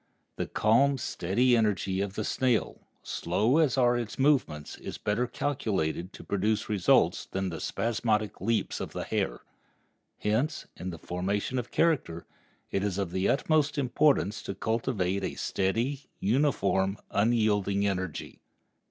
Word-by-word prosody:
The - - -3
calm, 135 +6 +3
steady 120 +3 +1
energy 100 -4 +1
of 100 -1 -3
the - - -2
snail, 125 -4 0 0.2
slow 110 - +1
as 145 -5 +3
are 120 -1 +4
its 120 -2 -3
movements, 130 - +1
is - - -6
better 110 +4 0
calculated 100 - -2
to - - -10
produce 105 +2 0
results 100 -5 +3
than 95 0 -2
the 80 -2 -6
spasmodic 110 -4 -1
leaps 110 +1 0
of - - -5
the - - -3
hare. - - -2 0.8
Hence, 125 +9 0
in 90 - -5
the 85 - -6
formation 100 +9 -2
of 120 - -5
character, 140 - +1 0.5
it 95 - 0
is 100 -2 -1
of 95 -4 -2
the 95 +2 +1
utmost 150 0 +2
importance 130 - +2
to 100 - -5
cultivate 105 -4 -1
a - - -3
steady, 120 +9 -1
uniform, 100 -5 +1
unyielding 105 -2 +2
energy. 95 -5 -3
105 Hz, 140 wpm, -29 LUFS, 95-125 Hz, 0.8 s, are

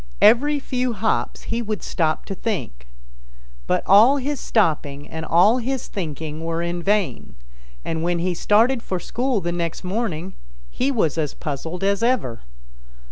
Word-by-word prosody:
Every 290 +5 +6
few 255 -2 -1
hops 220 +1 -1
he 235 - -2
would 215 -2 -4
stop 160 -3 -1
to - - -4
think, 160 - -4 0.8
but - - +1
all 225 +9 +7
his 280 0 -2
stopping 150 -8 0
and 160 0 -6
all 185 +10 +4
his 260 +1 -3
thinking 160 -3 -5
were 165 0 -2
in 175 0 -2
vain, 195 - -1 0.5
and 160 -1 -2
when 175 +1 0
he 180 +1 0
started 230 +8 +3
for 185 -4 -3
school 245 +4 -1
the 175 0 -2
next 170 -2 -3
morning 190 -3 -3 0.4
he 260 - 0
was 165 - 0
as 150 -3 -2
puzzled 160 +5 -5
as 200 +1 +1
ever. 230 - 0
190 Hz, 155 wpm, -22 LUFS, 165-235 Hz, 0.8 s, all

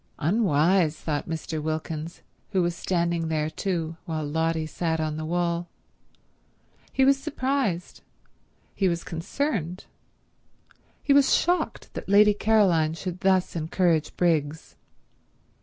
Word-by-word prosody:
"Unwise," 170 -2 +2
thought 150 -2 -3
Mr. 160 -1 -4
Wilkins, 155 +1 -4 0.3
who 185 -2 +3
was 175 0 -1
standing 170 -2 -1
there 155 -1 -1
too, 165 -2 -3
while 155 -2 -3
Lotty 160 +1 0
sat 160 0 -2
on 155 -1 -1
the 155 0 -4
wall. 170 +1 -1 1.2
He 265 - +3
was 275 0 +5
surprised, 260 -12 -2 0.7
he 190 -2 +1
was 170 -1 -2
concerned, 180 - -3 1.2
he 280 - +3
was 280 -1 +5
shocked 355 +1 -1
that - - -7
Lady 210 +1 +6
Caroline 190 -8 +3
should 180 +1 -5
thus 190 -2 +2
encourage 165 -1 0
Briggs. 160 -3 0
170 Hz, 120 wpm, -26 LUFS, 160-190 Hz, 1.2 s, Lady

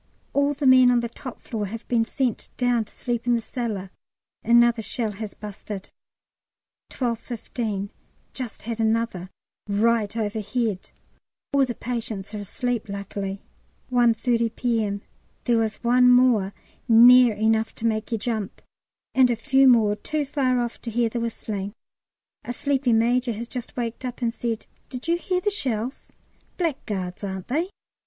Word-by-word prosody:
All 285 +1 +2
the 285 0 -3
men 255 -1 +7
on 245 -1 +4
the 235 - -3
top 245 +1 -9
floor 215 -3 -3
have 225 +3 -7
been 230 -2 +2
sent 250 -2 -2
down 245 -3 +2
to - - -15
sleep 240 -1 -3
in 240 - +4
the - - +1
cellar; 215 -6 -4 0.5
another 235 0 +5
shell 220 +1 -2
has 210 0 -7
busted. 205 -1 -8 1.0
12.15. 230 -4 -3 0.4
Just 250 -5 -5
had 230 0 -4
another, 220 -5 0 0.4
right 220 +1 +2
overhead; 215 -1 -2 0.6
all 275 -1 +5
the 240 -2 -4
patients 225 -4 -4
are 210 - -4
asleep, 225 +2 -3
luckily. 200 0 -5 0.5
1.30 235 -1 +2
P.M. 220 -5 0 0.4
There 235 -2 +3
was 220 -1 0
one 250 +1 +5
more, 245 -6 +5 0.4
near 240 0 +8
enough 220 +1 +1
to 230 - -5
make 220 0 0
you 225 - +1
jump, 215 -2 -3 0.5
and 260 -1 +5
a 240 - +2
few 270 +3 +4
more 220 -5 +5
too 300 +6 -2
far 265 -3 +1
off 235 -1 -4
to 235 - -5
hear 230 0 +1
the 235 - -3
whistling. 210 -3 -4 0.7
A 245 - -4
sleepy 270 -1 0
major 240 +2 +2
has 230 +3 -6
just 250 +1 -7
waked 235 0 -3
up 250 0 -5
and 230 -1 +1
said, 230 -2 -3 0.2
"Did 255 +3 -7
you 335 - +3
hear 365 +1 -1
the 415 - +1
shells? 255 - -3 0.5
Blackguards, 210 - -3
aren't 190 -2 -5
they?" 325 +8 0
235 Hz, 155 wpm, -24 LUFS, 215-250 Hz, 1.0 s, near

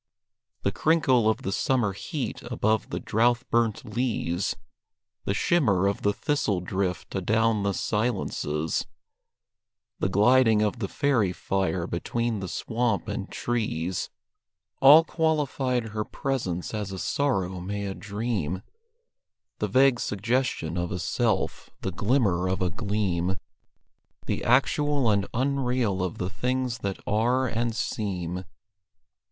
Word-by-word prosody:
The - - +2
crinkle 130 -8 +3
of 110 - -1
the 95 - -2
summer 110 -1 +1
heat 130 - -4
above 110 -3 0
the - - -3
drouth 120 +3 +1
burnt 115 -1 +1
leas; 110 -6 -1 0.7
The 100 - 0
shimmer 105 - +2
of 100 0 0
the 105 - +3
thistle 105 -6 0
drift 90 0 -3
adown 110 +3 +2
the 100 -1 0
silences; 95 -8 -1 1.1
The 95 - +1
gliding 110 +2 +5
of 105 +3 -1
the 100 - -1
fairy 115 -6 +1
fire 95 -1 -1
between 115 +6 -2
the 95 - -4
swamp 115 +1 -1
and - - -4
trees: 95 -7 -2 0.7
All 145 +4 +9
qualified 140 -8 0
her 105 0 -2
presence 105 -11 -3
as 105 -3 -3
a 95 - -5
sorrow 95 -7 0
may 100 +2 -3
a 95 - -3
dream 100 -2 -3 1.0
The - - 0
vague 130 -1 +4
suggestion 105 -6 -1
of 85 +1 -2
a 90 - -2
self; 110 +2 -1
the - - -2
glimmer 100 -6 +1
of 95 - 0
a 90 - 0
gleam; 100 -5 -1 0.9
The - - -2
actual 135 0 +3
and 100 -2 +1
unreal 125 -6 0
of 90 -2 -2
the 90 +1 -3
things 125 0 -1
that 100 -1 -3
are 120 +5 +2
and 115 -1 -1
seem. 90 -5 -3
110 Hz, 130 wpm, -26 LUFS, 95-125 Hz, 1.1 s, All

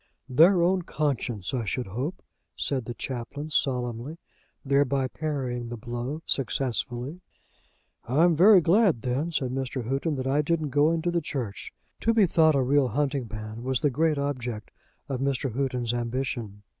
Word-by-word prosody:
"Their 170 +7 +5
own 185 +1 +2
conscience, 135 - -2
I 125 -3 0
should 125 +5 -2
hope," 125 - -4 0.3
said 130 -4 -1
the 120 - -6
Chaplain, 135 +6 -5
solemnly, 125 +1 -1 0.5
thereby 140 -1 +2
parrying 130 -5 -3
the 120 - -5
blow 120 +7 -5
successfully. 130 +3 -1 0.8
"I 135 +7 +2
am 175 -2 +5
very 190 +3 +7
glad, 175 - +3
then," 130 +6 -1
said 130 -6 -1
Mr. 130 -1 -3
Houghton, 140 +4 -1
"that 130 -1 -3
I 140 +3 +2
didn't 155 0 0
go 145 +3 +3
into 165 +1 0
the 170 -1 0
Church." 125 -9 -5 0.3
To 230 0 +1
be 215 -3 +6
thought 160 -3 +4
a 135 - +3
real 135 +1 +3
hunting 135 +1 -1
man 110 +1 -6
was 130 +2 -1
the 145 -3 +2
great 155 +3 +1
object 125 -6 -3 0.4
of 135 -3 -3
Mr. 135 -2 -1
Houghton's 125 -2 -1
ambition. 120 -4 -3
135 Hz, 160 wpm, -27 LUFS, 120-155 Hz, 0.8 s, very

